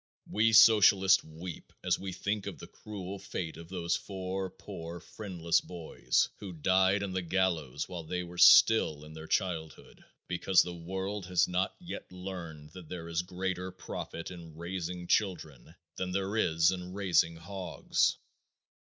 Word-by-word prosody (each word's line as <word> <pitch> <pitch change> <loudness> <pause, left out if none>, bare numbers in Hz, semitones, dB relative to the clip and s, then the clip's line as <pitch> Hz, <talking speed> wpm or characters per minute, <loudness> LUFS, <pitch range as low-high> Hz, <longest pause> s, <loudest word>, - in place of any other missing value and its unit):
We 110 +2 +2
socialists 100 -4 +7
weep 80 +2 -9
as - - +1
we 95 -1 -5
think 100 +3 -2
of - - -5
the - - -9
cruel 100 -2 -8
fate 80 -4 -5
of 85 +1 -11
those 85 -2 -1
four 95 -1 -4
poor, 85 -1 -8
friendless 90 -6 -1
boys 80 -8 0
who 95 -3 -7
died 95 +4 +3
on 100 - -3
the 95 - 0
gallows 85 -6 -1
while 90 -3 -6
they 90 +3 -3
were 90 0 -9
still 80 -11 +7
in 75 - -11
their 80 0 -9
childhood, 80 -5 -3 0.2
because 90 +1 +3
the 90 - -6
world 95 +3 -4
has 90 -1 +3
not 90 +1 -1
yet 175 - -8
learned 85 -5 -8
that 90 -2 -11
there 85 -2 -6
is 85 +1 0
greater 90 0 -3
profit 85 -2 -7
in 85 -3 -11
raising 90 0 -4
children 80 - -1 0.2
than 90 0 -3
there 100 +2 -1
is 80 -5 +3
in 90 -1 -6
raising 90 -4 +2
hogs. 95 +2 -1
90 Hz, 155 wpm, -31 LUFS, 85-95 Hz, 0.2 s, socialists